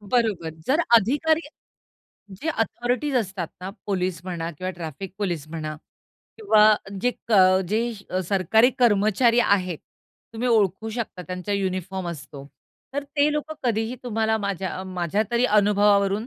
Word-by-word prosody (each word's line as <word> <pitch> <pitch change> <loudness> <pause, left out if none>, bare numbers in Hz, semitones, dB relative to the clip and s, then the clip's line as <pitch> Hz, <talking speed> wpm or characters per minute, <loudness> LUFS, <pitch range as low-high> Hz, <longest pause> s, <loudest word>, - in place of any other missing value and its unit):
बरोबर. 205 -6 0 0.2
जर 295 +5 +3 0.2
अधिकारी 290 +9 +2 1.0
जे 300 +12 -5
अथॉरिटीज 245 +1 -1
असतात 190 -7 -2
ना 185 +1 -5 0.2
पोलिस 185 -4 -1
म्हणा 170 -3 -4
किंवा 185 +4 -4
ट्रॅफिक 175 +2 -7
पोलिस 175 -8 -2
म्हणा 155 -1 -5 0.6
किंवा 215 - +5 0.3
जे 245 - +3 0.2
क - - +2 0.4
जे 230 +4 0 0.4
सरकारी 210 +5 +4
कर्मचारी 230 +1 +4
आहेत, 185 -7 +1 0.5
तुम्ही 235 +2 -2
ओळखू 215 -2 +2
शकता 220 -5 -5
त्यांचा 185 +3 -4
युनिफॉर्म 190 -2 -2
असतो. 145 -4 -8 0.5
तर 285 0 -2
ते 285 +1 +1
लोकं 300 +1 -3
कधीही 225 +1 0
तुम्हाला 220 -2 0
माझ्या, 195 -2 -3
माझ्या 185 +2 -1
तरी 240 +1 +2
अनुभवावरून 205 0 +3
205 Hz, 130 wpm, -24 LUFS, 185-235 Hz, 1.0 s, किंवा